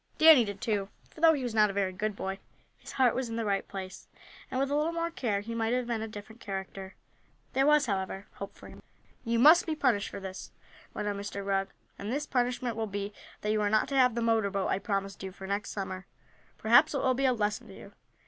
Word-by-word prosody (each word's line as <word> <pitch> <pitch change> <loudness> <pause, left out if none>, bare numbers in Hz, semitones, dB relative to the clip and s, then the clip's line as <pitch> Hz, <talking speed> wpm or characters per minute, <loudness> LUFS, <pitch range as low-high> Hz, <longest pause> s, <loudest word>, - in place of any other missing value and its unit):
Danny 315 -5 +8
did, 200 -2 -6
too, 205 -3 -1 0.2
for 315 - -14
though 325 -1 +7
he 280 -4 -2
was 240 -3 -3
not 215 -1 +5
a - - -4
very 195 -2 0
good 210 +2 -2
boy, 195 0 -4 0.4
his - - -10
heart 255 -3 +4
was 255 -2 -2
in 225 - -4
the 230 -1 -2
right 200 -1 0
place, 190 -1 -8 0.4
and 260 - -2
with 275 +1 0
a - - +2
little 305 +3 +1
more 335 0 -2
care 215 -10 -1
he 230 +3 -6
might 225 0 0
have 250 0 0
been 235 -2 -2
a 220 - -3
different 220 +2 -11
character. 195 -1 -6 0.6
There 270 +2 +3
was, 300 -1 +5
however, 195 -2 -3
hope 200 0 -8
for - - -13
him. - - -13 0.4
"You 230 -1 0
must 310 +9 +7
be 315 - -1
punished 245 -9 +1
for - - -7
this," 190 -1 -7 0.5
went 210 - -3
on 205 -1 -2
Mr. 200 0 -5
Rugg, 195 -1 +1 0.3
"and 205 +3 -4
this 290 +3 -1
punishment 245 -3 -1
will 220 0 -2
be 200 0 -4 0.3
that 210 - 0
you 215 0 +1
are 205 - +2
not 215 +1 +2
to 275 - -2
have 250 -3 +4
the 235 - -1
motor 225 -3 +2
boat 195 -1 -1
I - - +1
promised 195 -1 -3
you 190 0 -5
for 190 +1 -10
next 200 +1 -2
Summer. 190 -2 -5 0.5
Perhaps 285 +7 +5
it 275 - 0
will 260 - +3
be 270 +2 0
a 260 - +5
lesson 210 -2 -2
to - - -12
you." - - -12
215 Hz, 250 wpm, -30 LUFS, 200-255 Hz, 0.6 s, Danny